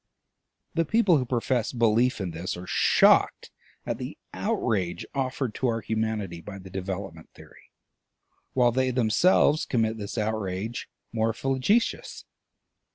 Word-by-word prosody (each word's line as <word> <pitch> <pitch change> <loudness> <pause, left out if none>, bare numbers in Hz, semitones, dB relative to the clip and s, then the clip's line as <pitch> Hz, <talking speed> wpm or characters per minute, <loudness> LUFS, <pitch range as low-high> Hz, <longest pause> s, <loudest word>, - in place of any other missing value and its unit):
The 165 - +2
people 190 0 +3
who 125 - -3
profess 120 -1 0
belief 115 0 +2
in 95 -3 -3
this 85 +2 -4
are 90 - -8
shocked - - +3 0.3
at - - -3
the - - -6 0.2
outrage 90 -6 -1
offered 130 -3 -2
to 130 - -1
our 115 -1 0
humanity 110 -5 -2
by 100 +2 -8
the 95 -1 -12
Development 95 -3 -5
Theory, - - -17 0.8
while 125 -2 +4
they 130 +2 +1
themselves 130 - +3
commit 110 -2 0
this 100 +3 -6
outrage 110 +1 -3 0.2
more 115 0 +1
flagitious. 135 - 0
110 Hz, 130 wpm, -26 LUFS, 100-130 Hz, 0.8 s, while